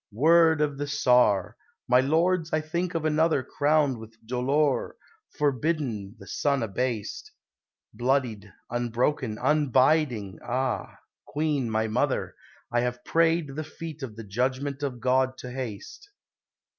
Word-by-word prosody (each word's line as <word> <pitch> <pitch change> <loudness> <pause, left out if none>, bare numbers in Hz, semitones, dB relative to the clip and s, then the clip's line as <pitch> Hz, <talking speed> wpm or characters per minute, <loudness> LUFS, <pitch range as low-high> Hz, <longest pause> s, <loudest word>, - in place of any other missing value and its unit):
Word 160 +5 +5
of 145 -2 0
the 145 - -2
Tsar! 125 -8 +3 0.3
My 125 0 +5
lords, 165 +4 +1
I 155 - +2
think 170 +3 -3
of 160 -1 -1
another 155 -2 +2
Crowned 145 -2 +1
with 110 0 -12
dolour, 130 +4 0 0.4
forbidden 135 -8 -1
the 100 - -13
sun 140 +5 0
abased, 115 +1 -3 0.6
Bloodied, 120 -6 -1 0.2
unbroken, 120 0 -1
abiding 130 - +2
Ah! 130 +1 -2 0.3
Queen, 145 -5 -1
my 110 0 0
Mother, 110 - 0 0.4
I 120 - +2
have 125 0 -3
prayed 165 -2 +2
the 155 - -3
feet 155 0 -8
of 120 -5 -6
the 115 - -8
Judgment 130 +7 -2
of 135 -4 -3
God 130 +1 +2
to 125 - -8
haste. 130 - -7
130 Hz, 130 wpm, -27 LUFS, 120-155 Hz, 0.6 s, Word